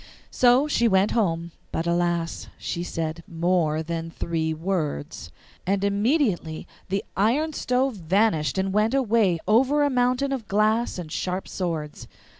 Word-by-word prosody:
So 250 +3 +4
she 235 -5 +2
went 195 0 +3
home, 170 -6 0 0.2
but 165 - -2
alas! 170 -1 -1
she 170 - -4
said 165 -1 -4
MORE 165 -2 0
THAN 165 0 -4
THREE 160 -1 -2
WORDS; 160 - -3 0.4
and 195 +1 +1
immediately 200 - 0 0.2
the 195 +1 -1
iron 270 +11 +1
stove 255 -3 0
vanished 180 -2 +1
and 190 0 0
went 215 +5 +2
away 220 -8 +2
over 265 +7 +4
a 285 - +2
mountain 250 +2 +1
of 250 -6 -3
glass 215 +3 +1
and 170 -4 -7
sharp 185 +3 -3
swords. 160 -5 -4
190 Hz, 140 wpm, -25 LUFS, 165-235 Hz, 0.4 s, So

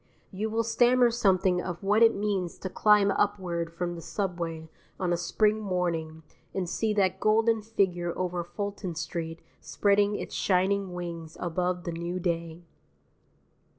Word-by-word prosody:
You 210 +3 -3
will 225 +1 0
stammer 240 +2 +4
something 190 -5 +2
of 180 0 -6
what 205 +3 +3
it 230 0 +6
means 200 -4 -2
to 190 - -6
climb 210 -1 +4
upward 180 -5 -1
from 175 +1 -3
the 170 - -7
subway 170 -5 -3 0.3
on 180 -2 +1
a - - +3
spring 210 +5 +1
morning 170 -5 -2 0.3
and 190 -2 -1
see 220 +5 -1
that 190 -2 +2
golden 220 +1 +3
figure 190 -5 0
over 180 -1 -2
Fulton 185 0 -5
Street 165 +1 -4 0.2
spreading 205 0 +2
its - - -5
shining 190 0 +1
wings 170 -2 -6
above 180 +1 -1
the 170 - -3
new 170 +2 -4
day. 170 -1 -3
185 Hz, 150 wpm, -28 LUFS, 170-205 Hz, 0.3 s, it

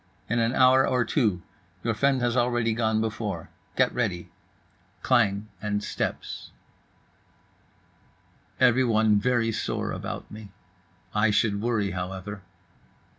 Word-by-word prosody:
—"In 120 +2 0
an 115 +2 +1
hour 130 0 +5
or 125 -2 +1
two: 105 - +1 0.4
your 115 - +1
friend 135 +3 +2
has 120 0 +1
already 120 -2 +1
gone 110 -1 +1
before. 105 -7 -4 0.2
Get 130 -1 +2
ready." 100 -8 -2 0.7
Klang 105 -2 +2
and 105 -1 -2
steps. - - -4 2.1
Everyone 115 -4 +4
very 115 +1 +1
sore - - -2
about - - -6
me. 105 -1 -10 0.6
I 105 +1 +3
should 105 -1 +1
worry, 105 -4 0
however. 95 +2 -5
110 Hz, 115 wpm, -26 LUFS, 105-120 Hz, 2.1 s, hour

